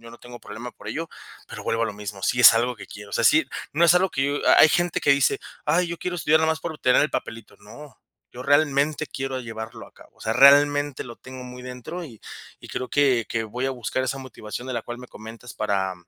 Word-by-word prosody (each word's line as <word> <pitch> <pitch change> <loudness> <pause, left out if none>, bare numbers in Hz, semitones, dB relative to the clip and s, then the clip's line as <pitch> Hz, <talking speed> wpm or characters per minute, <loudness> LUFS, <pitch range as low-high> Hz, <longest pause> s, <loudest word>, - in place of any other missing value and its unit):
yo 115 0 -12
no 120 - -13
tengo 120 0 -11
problema 115 +2 -9
por 105 - -16
ello, 160 +9 -4 0.4
pero - - -9
vuelvo 115 0 0
a - - +3
lo 115 - -3
mismo, 100 -1 -8
si 125 - 0
es 120 -2 +9
algo 120 +2 0
que 105 - -11
quiero, 105 0 -11
o - - -17
sea, - - 0
sí. - - +5 0.3
No 165 +4 +3
es 170 - +7
algo 185 +1 +2
que 135 - -1
yo 140 - -1
ha - - +6
hay - - +8
gente 175 +2 0
que 145 - +2
dice: 140 -1 +3 0.2
"Ay, 170 +4 +1
yo 170 0 -5
quiero 180 - -4
estudiar 160 -2 +3
nada 160 0 +2
más 160 - -6
para 160 -1 -5
obtener 125 -3 +3
el 150 - 0
papelito", 115 -1 -6
no. 120 +8 -14 0.3
Yo 125 +1 -9
realmente 145 +1 +2
quiero 135 -1 -4
llevarlo 115 -1 -8
a - - -29
cabo. - - -19
O - - -25
sea, 110 - -1
realmente 145 +1 +5
lo 120 - -10
tengo 130 0 -10
muy 125 0 -10
dentro, 125 +8 -7
y 115 -9 -13 0.4
y - - -12
creo 130 - -4
que 135 -5 +2
que 115 - -1
voy 120 +4 -4
a - - -1
buscar 130 0 -3
esa 135 - -3
motivación 125 -2 -8
de - - -3
la 115 - -3
cual 120 +1 -7
me 125 0 -11
comentas 115 +2 -11
para 100 -3 -1
125 Hz, 260 wpm, -24 LUFS, 115-145 Hz, 0.4 s, es